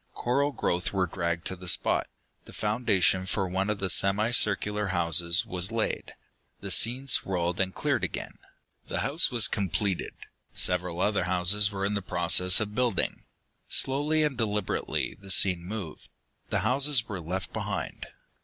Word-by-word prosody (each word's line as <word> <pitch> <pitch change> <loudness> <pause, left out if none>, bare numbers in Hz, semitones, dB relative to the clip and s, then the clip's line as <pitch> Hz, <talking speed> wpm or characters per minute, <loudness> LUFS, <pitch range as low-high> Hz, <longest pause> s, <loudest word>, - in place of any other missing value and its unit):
Coral 140 +4 0
growth 90 -9 -1
were 95 -1 +1
dragged 85 0 -3
to 95 - -2
the 90 0 -11
spot. 85 - +1 0.4
The - - -14
foundation 100 -4 +1
for 95 0 -1
one 95 +3 -1
of 105 - 0
the 95 - -2
semi 100 +6 +3
circular 105 -2 +1
houses 85 +2 +2
was 90 -2 -2
laid. 115 -1 -2 0.4
The - - -6
scene 125 +4 +4
swirled 90 -8 0
and 95 -1 +1
cleared - - -1
again. - - -5 0.5
The - - -2
house 145 +5 +2
was 120 -5 +3
completed. 100 -1 -2 0.4
Several 90 -1 0
other 100 -4 +1
houses 95 +3 +2
were 100 -1 -3
in 100 0 -1
process 90 0 +3
of 105 -1 -3
building. 120 -5 -1 0.4
Slowly 150 +4 +1
and 150 -3 0
deliberately, 105 -4 -2
the 100 -1 -14
scene 95 -2 +2
moved. 95 -4 -7 0.4
The - - 0
houses 135 -3 +1
were 100 -4 -5
left 90 +3 -5
behind. - - -4
100 Hz, 155 wpm, -27 LUFS, 90-110 Hz, 0.5 s, scene